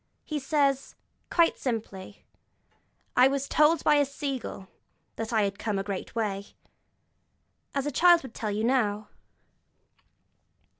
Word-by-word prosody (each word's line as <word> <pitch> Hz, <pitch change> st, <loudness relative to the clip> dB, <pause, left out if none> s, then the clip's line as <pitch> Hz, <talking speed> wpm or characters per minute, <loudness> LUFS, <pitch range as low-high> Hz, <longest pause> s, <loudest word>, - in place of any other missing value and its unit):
He 305 Hz, -1 st, -3 dB
says, 275 Hz, -1 st, 0 dB, 0.3 s
quite 335 Hz, -1 st, +3 dB
simply: 210 Hz, -6 st, -5 dB, 0.9 s
'I 250 Hz, +1 st, +7 dB
was 275 Hz, 0 st, -1 dB
told 305 Hz, +1 st, +3 dB
by 295 Hz, -, +4 dB
a 290 Hz, -, +4 dB
sea 275 Hz, -1 st, -3 dB
gull 195 Hz, -4 st, -8 dB, 0.5 s
that 225 Hz, 0 st, -4 dB
had 205 Hz, -4 st, 0 dB
come 215 Hz, -3 st, -2 dB
a 195 Hz, -, -1 dB
great 195 Hz, +1 st, -6 dB
way,' 200 Hz, -3 st, -3 dB, 1.2 s
as 275 Hz, -1 st, 0 dB
a 295 Hz, -, -1 dB
child 345 Hz, +4 st, +5 dB
would 260 Hz, -3 st, -10 dB
tell 215 Hz, -, -4 dB
you 210 Hz, +1 st, -2 dB
now. 215 Hz, -4 st, 0 dB
255 Hz, 135 wpm, -27 LUFS, 210-285 Hz, 1.2 s, I